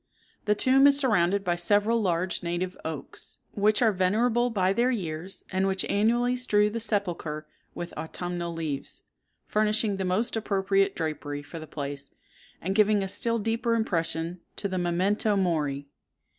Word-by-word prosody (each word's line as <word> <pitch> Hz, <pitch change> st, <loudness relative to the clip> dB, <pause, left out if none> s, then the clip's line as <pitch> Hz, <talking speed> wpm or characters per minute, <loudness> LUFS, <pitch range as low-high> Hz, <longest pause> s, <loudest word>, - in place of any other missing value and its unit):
The 210 Hz, -, +3 dB
tomb 265 Hz, +5 st, +5 dB
is 280 Hz, -1 st, +5 dB
surrounded 200 Hz, -8 st, +2 dB
by 175 Hz, -2 st, +1 dB
several 205 Hz, +6 st, +2 dB
large 180 Hz, -1 st, 0 dB
native 175 Hz, +2 st, -2 dB
oaks, 160 Hz, -3 st, -6 dB
which 210 Hz, +3 st, +2 dB
are 225 Hz, -, +5 dB
venerable 225 Hz, +6 st, +2 dB
by 190 Hz, -4 st, +1 dB
their 240 Hz, +4 st, +2 dB
years, 180 Hz, -5 st, -4 dB
and 190 Hz, +1 st, +1 dB
which 190 Hz, -1 st, 0 dB
annually 240 Hz, +4 st, +2 dB
strew 210 Hz, -4 st, +2 dB
the 230 Hz, -, -3 dB
sepulchre 175 Hz, -8 st, -2 dB, 0.3 s
with 175 Hz, 0 st, -6 dB
autumnal 170 Hz, +2 st, -4 dB
leaves, 160 Hz, -4 st, -5 dB, 0.4 s
furnishing 215 Hz, -1 st, +1 dB
the 190 Hz, -, -2 dB
most 190 Hz, +7 st, 0 dB
appropriate 195 Hz, -2 st, +1 dB
drapery 145 Hz, -3 st, -3 dB
for 165 Hz, +3 st, -8 dB
the 155 Hz, -, -9 dB
place, 140 Hz, -1 st, -5 dB, 0.5 s
and 190 Hz, +3 st, -1 dB
giving 210 Hz, -1 st, +3 dB
a -, -, -2 dB
still 230 Hz, +4 st, 0 dB
deeper 230 Hz, +2 st, 0 dB
impression 165 Hz, -5 st, -1 dB, 0.2 s
to 200 Hz, -, -3 dB
the 185 Hz, -1 st, -2 dB
memento 190 Hz, +5 st, +1 dB
mori. 150 Hz, -7 st, 0 dB
195 Hz, 155 wpm, -27 LUFS, 170-215 Hz, 0.5 s, tomb